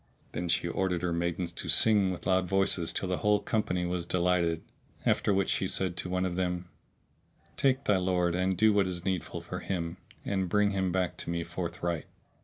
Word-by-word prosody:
Then 90 -1 -3
she 85 +1 +2
ordered 90 0 -1
her 85 -1 0
maidens 85 +1 -1
to - - -5
sing 105 -4 +4
with 90 - -5
loud 95 0 +2
voices 95 -3 +1
till 95 - -2
the 90 0 0
whole 105 0 +3
company 90 -5 0
was 90 -1 -2
delighted; 85 -2 +1 0.4
after - - +2
which 95 -1 +2
she - - +1
said 95 -2 -1
to 90 - -3
one 90 0 0
of 90 -1 -2
them, 90 -1 -2 0.9
"Take 135 -1 +2
thy 105 - +3
lord, 90 -2 +1
and 90 +1 +1
do 110 +2 +5
what 100 -2 +3
is 90 -2 -4
needful 95 -3 -2
for - - -5
him 85 -3 -3 0.3
and 95 -2 0
bring 105 +2 +3
him 95 -2 0
back 90 -1 0
to - - -6
me 85 0 -1
forthright." 85 -1 -3
90 Hz, 200 wpm, -30 LUFS, 85-95 Hz, 0.9 s, do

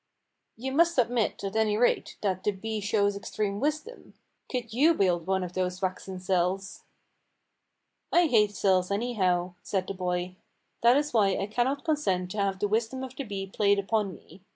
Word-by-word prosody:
"You 265 +4 -4
must 335 +4 +3
admit, 240 -4 +1
at 195 +1 -4
any 215 -1 +2
rate, 245 - +1
that 190 -3 -1
the - - +2
bee 215 +2 -4
shows 205 -1 +1
extreme 200 0 -3
wisdom. 310 - -3 0.4
Could 245 -3 -3
you 310 +8 +4
build 175 - +1
one 190 -1 +1
of 180 -1 -6
those 185 0 -2
waxen 185 0 -4
cells?" 185 +1 -1 1.3
"I 350 0 +5
hate 210 -8 +3
cells, 185 -2 +2
anyhow," 190 -5 0
said 190 -2 -2
the 195 - -4
boy. 180 0 -3 0.4
"That 240 +3 +6
is 295 -1 -1
why 200 -4 +3
I 195 - -1
cannot 245 +6 -1
consent 190 - 0
to 210 - -4
have 195 -1 0
the 205 - 0
wisdom 230 +5 -1
of 260 0 -7
the 275 - -4
bee 200 -4 -4
played 200 +1 +2
upon 200 -2 0
me. 180 +4 -17
205 Hz, 175 wpm, -28 LUFS, 185-240 Hz, 1.3 s, That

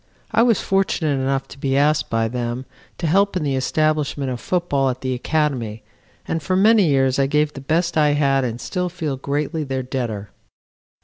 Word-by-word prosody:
I - - +3
was 230 -3 +3
fortunate 190 -6 +1
enough 135 0 -1
to 140 - -12
be 135 0 0
asked 150 +2 +2
by 115 0 +1
them 120 +2 -3 0.3
to 175 - -4
help 195 +4 +2
in 170 - -2
the 140 -2 0
establishment 145 0 0
of 125 - -4
football 145 -6 0
at 130 0 -4
the 130 -1 -1
Academy 125 -5 -1 0.4
and 165 - -1
for 170 +5 -1
many 210 0 +5
years 135 -2 +2
I 135 - +3
gave 150 +1 +1
the 135 - -8
best 165 +5 0
I 150 -2 +4
had 135 -2 +2
and 120 -1 -3
still 180 +4 -2
feel 160 -5 -3
greatly 145 +4 -2
their 135 -2 -3
debtor. 115 -7 -4
140 Hz, 190 wpm, -21 LUFS, 130-160 Hz, 0.4 s, many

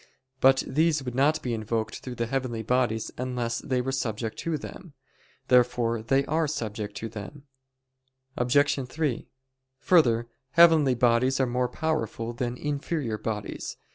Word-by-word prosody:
But 135 0 +5
these 155 +1 +1
would 125 -2 -5
not 140 +5 +2
be 125 - -2
invoked 110 0 -2
through 125 -1 -7
the 115 - -1
heavenly 120 -2 -2
bodies 120 -2 0
unless 125 -2 -2
they 130 -4 -1
were 135 +2 -2
subject 115 -4 -3
to 165 -2 -1
them. 160 +2 -10 0.5
Therefore 120 -2 +3
they 135 +4 +1
are 155 +2 +1
subject 105 -7 -4
to 115 - -4
them. 110 +6 -9 0.9
Obj. 135 +1 +2
3: 145 -3 -2 0.5
Further, 120 -9 +3 0.3
heavenly 160 -6 +6
bodies 125 +2 +2
are 130 - +3
more 125 0 0
powerful 155 -7 -2
than 120 +1 -3
inferior 145 -5 -2
bodies. 105 -2 -5
125 Hz, 140 wpm, -27 LUFS, 115-145 Hz, 0.9 s, heavenly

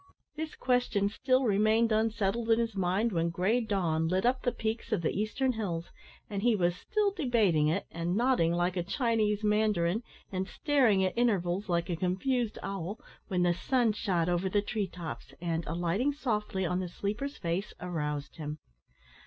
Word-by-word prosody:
This 315 0 -5
question 245 -6 +1
still 255 +4 +1
remained 220 +1 +3
unsettled 220 0 +1
in 225 - +5
his 230 -2 -1
mind 190 +5 +1
when 170 -2 +1
grey 190 +8 +1
dawn 175 -7 0
lit 185 +4 +1
up 255 +1 +2
the 245 - +1
peaks 225 +1 -3
of 205 -6 0
the - - +1
eastern 215 +6 0
hills, 180 -8 -3 0.4
and 200 -1 -3
he 235 0 +4
was 175 -3 +1
still 420 - 0
debating 220 - +2
it, 165 +6 0
and 170 +2 -2
nodding 235 -8 +3
like 175 +1 0
a 180 - 0
Chinese 215 +1 0
mandarin, 210 -2 +2 0.3
and 190 0 -2
staring 240 -11 +3
at 185 - -2
intervals 200 -5 +1
like 170 -1 +1
a 175 - -1
confused 210 +7 0
owl, 195 +2 -4 0.3
when 180 -3 +1
the 175 -1 +3
sun 235 +5 +1
shot 180 -6 0
over 175 +2 +1
the 205 +1 +1
tree 210 -1 -2
tops, 170 -3 -8
and, 165 -1 -1
alighting 175 - 0
softly 210 -9 -1
on 180 +1 0
the 185 -1 -3
sleeper's 215 +11 -3
face, 175 +4 -2
aroused 150 -5 -3
him. 150 -1 -5
200 Hz, 175 wpm, -30 LUFS, 175-230 Hz, 0.4 s, in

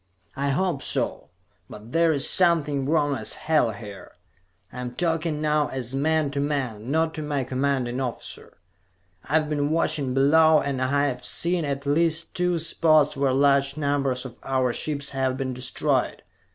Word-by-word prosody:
"I 140 +1 -1
hope 155 0 0
so. - - -3 0.4
But 110 +3 -11
there's 165 -3 +3
something 150 -6 +2
wrong 145 -3 +2
as - - -2
hell 155 -7 +1
here. 105 -3 -10 0.6
I'm 125 0 -6
talking 165 -3 -1
now 150 -1 +1
as 130 -1 -4
man 155 +1 +1
to 140 - -3
man; 130 -6 -3
not 160 +2 +1
to 155 - -5
my 145 -3 -2
commanding 130 -1 -1
officer. 125 -3 -6 0.7
I've 155 +1 +2
been 145 -1 -1
watching 155 -5 0
below, 155 +3 +5
and 135 -2 -3
I 140 +3 +1
have 135 -3 -3
seen 170 -1 0
at 140 0 -3
least 160 +3 +1
two 180 -1 0
spots 155 -2 +3
where 135 -1 +1
large 140 +1 +2
numbers 140 -3 -1
of 120 -2 -10
our 130 -2 0
ships 145 0 -3
have 130 -1 -1
been 130 -1 -3
destroyed. 125 0 -1
140 Hz, 155 wpm, -24 LUFS, 130-155 Hz, 0.7 s, below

